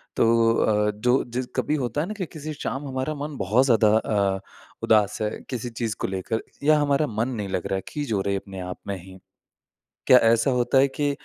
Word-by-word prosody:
तो 115 0 +4
अ, 105 0 +2
जो 125 +5 +1
जि 125 +2 -2
कभी 150 - 0
होता 135 0 -1
है 165 - -3
ना 215 - -4
कि 185 - -2
किसी 155 -2 -7
शाम 145 -1 -4
हमारा 130 +3 -2
मन 145 -1 -6
बहुत 105 +7 +2
ज़्यादा 110 -4 +4
अ, 100 -3 0 0.4
उदास 105 -2 +3
है 105 - +1 0.2
किसी 125 -1 -4
चीज़ 115 -2 -3
को - - -1
लेकर। 95 +4 -3 0.2
या 155 +1 +5
हमारा 145 +1 +2
मन 110 0 -1
नहीं 105 -5 -4
लग 90 - -2
रहा 95 - -1
है 95 - -3
खीज 145 -5 -4
हो 100 - +1
रहे 100 0 -1
अपने 95 -1 -6
आप 90 0 -6
में 100 - -2
ही। 95 0 -12 0.9
क्या 125 - +8
ऐसा 115 +4 +2
होता 125 +1 +2
है 135 +1 +5
कि 145 +1 -1
115 Hz, 220 wpm, -24 LUFS, 105-140 Hz, 0.9 s, क्या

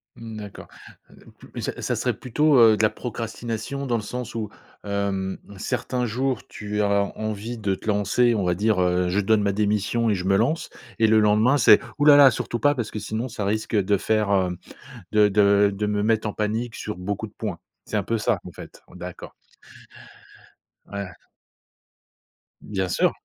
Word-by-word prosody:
Mmh, 115 -1 -9
d'accord. 105 -2 -9 0.4
Mmh - - -18 0.4
d - - -4
ça - - -4
ça - - -1
serait - - 0
plutôt, 145 +3 +2
heu, 110 -2 +7
de - - 0
la 110 - +5
procrastination 115 +3 -5
dans 120 -3 0
le 110 - -3
sens 125 +1 -6
où, 110 -3 -3 0.3
hem, 100 -2 -2 0.2
certains 125 +5 -2
jours 130 +3 -2
tu 105 0 -4
as 100 -1 +1
envie 110 +2 -4
de 100 -3 -1
te 100 - -13
lancer, 105 +4 +2
on 100 - 0
va 90 0 +1
dire: 105 0 +1
«Heu, 90 0 +1
je 95 - +1
donne 105 +1 +2
ma 100 - +2
démission 105 +3 0
et 105 - +2
je 90 - -4
me 95 +1 +3
lance» 150 +10 0 0.3
et 110 - +5
le 110 0 +5
lendemain, 110 +6 +4
c'est: - - +7 0.2
«Ouh 145 - +2
là 145 -1 +9
là 135 -2 +8
surtout 120 +1 -3
pas 145 0 +3
parce 120 -4 -4
que 105 - -4
sinon 110 +5 -3
ça 110 -4 -5
risque 110 +2 -1
de 100 0 +2
faire 105 +1 0
hem, 90 -3 +1 0.5
de 105 -1 +5
de 100 0 +4
de 105 +2 -2
me 105 0 0
mettre 110 0 +1
en 105 - -3
panique 110 +3 -2
sur 105 -4 -6
beaucoup 100 +4 -4
de 105 - -20
points». 100 -6 -5 0.3
C'est - - -2
un - - 0
peu 115 - -1
ça 105 -2 0
en 90 - -9
fait? - - -12
En - - -17
d'accord. - - -9 1.5
Ouais. 100 -1 -6 1.5
Bien 95 -3 -3
sûr. - - +2
105 Hz, 195 wpm, -24 LUFS, 100-115 Hz, 1.5 s, là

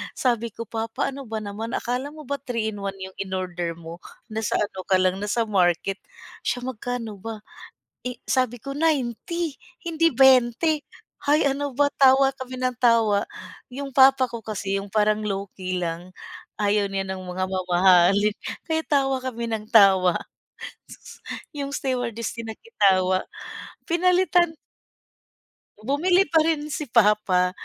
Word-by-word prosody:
Sabi 235 -2 0
ko, 230 - -6
"Pa, 225 0 -3
paano 275 +3 -3
ba 220 0 -3
naman, 215 +3 -5
akala 250 +3 -2
mo 305 0 -11
ba 280 +1 -3
3 230 -3 -2
in 205 - -8
1 195 0 -3
'yung 190 0 -9
inorder 180 -3 -3
mo? 170 +1 -10 0.3
Nasa 220 0 -1
ano 200 -2 -3
ka 190 - +4
lang 185 +1 +1
nasa 210 +3 0
market." 185 -1 +1 0.4
"Siya 245 0 -2
magkano 245 -3 -4
ba?" 225 +1 -6 0.7
Eh, 250 0 -3
sabi 255 -2 +1
ko, 275 - -5
90 310 +2 -1 0.3
hindi 330 0 +2
20 265 +4 +4 0.5
hay, 300 +2 +4
ano 280 -1 -1
ba 285 +1 +3
tawa 270 0 +6
kami 255 0 -8
ng 255 -1 -2
tawa. 230 -4 +3 0.4
'Yung 275 +2 -6
papa 265 0 +6
ko 235 - -5
kasi 200 -2 -3
'yung 200 - -7
parang 210 +1 +2
low-key 195 -3 -4
lang, 170 +2 -5 0.4
ayaw 205 -1 +1
niya 195 0 -2
ng 190 - -5
mga 185 +1 -3
mamahalin, 185 +2 +4 0.3
kaya 320 -1 -1
tawa 270 -2 +2
kami 235 -3 -4
ng 215 -1 -3
tawa 195 -6 +5 0.8
sus - - -13 0.3
'yung 280 -1 -4
stewardess 245 -5 -2
din 230 -1 -5
nakitawa, 190 - +1 0.6
pinalitan. 355 -1 +2 1.3
Bumili 355 - +3
pa 325 - +5
rin 305 -2 -1
si 300 -1 -3
papa, 205 -5 +3
230 Hz, 145 wpm, -24 LUFS, 195-270 Hz, 1.3 s, tawa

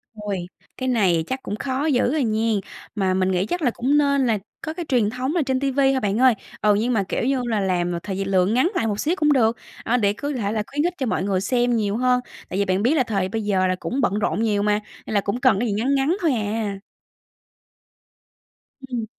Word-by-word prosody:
Ôi, 210 -2 -3 0.4
cái 260 0 -2
này 190 -9 +2
chắc 260 0 -4
cũng 205 - -4
khó 265 +5 -2
dữ 265 -3 +2
à 310 - +1
nghen. 220 -2 +1 0.4
Mà 190 -3 +1
mình 185 0 +1
nghĩ 185 +1 +1
chắc 355 - -3
là 255 -6 +2
cũng 265 +6 +1
nên 280 -3 +2
là 220 -3 +2 0.2
có 315 - -4
cái 345 +1 -5
truyền 235 -6 +2
thống 255 +7 -3
là 345 - +3
trên 260 -1 0
ti 275 0 0
vi 270 0 +3
thôi 270 - +1
bạn 205 +1 0
ơi. 255 -1 +6 0.3
Ừ, 210 -1 +4
nhưng 230 +4 0
mà 210 -4 +2
kiểu 190 - -2
như 265 +1 +1
là 225 -3 0
làm 180 -3 0
là 170 - -2
thời 195 - -4
gi 195 - -1
lượng 190 +1 +2
ngắn 260 +10 +2
lại 225 - +1
một 205 -1 -2
xíu 325 +4 +1
cũng 300 -3 +3
được, 230 -3 +2 0.3
à, 245 - +1
để 205 -4 +2
cứ 285 +7 -4
thể 210 -6 -2
là 215 -1 -1
khuyến 290 +2 -1
khích 350 +1 0
cho 265 - -1
mọi 215 - -1
người 190 -1 0
xem 245 +2 +1
nhiều 210 -2 0
hơn. 250 0 +2 0.3
Tại 185 - -2
vì 200 - +2
bạn 190 +1 0
biết 250 +6 +3
là 270 - +3
thời 195 -5 -1
bây 220 +3 -2
giờ 190 -3 +1
là 185 - +1
cũng 270 +3 -2
bận 210 -4 +1
rộn 210 0 0
nhiều 210 -2 +1
mà, 210 0 +2 0.3
nên - - -5
là 205 - +3
cũng 200 +5 -2
cần 255 -7 +3
cái 240 - 0
gì 210 - -1
ngắn 245 +7 +1
ngắn 275 +6 +2
thôi 330 -4 +2
à. 210 -2 -2 2.1
Ừm. 240 -3 -3
225 Hz, 260 wpm, -22 LUFS, 200-260 Hz, 2.1 s, ơi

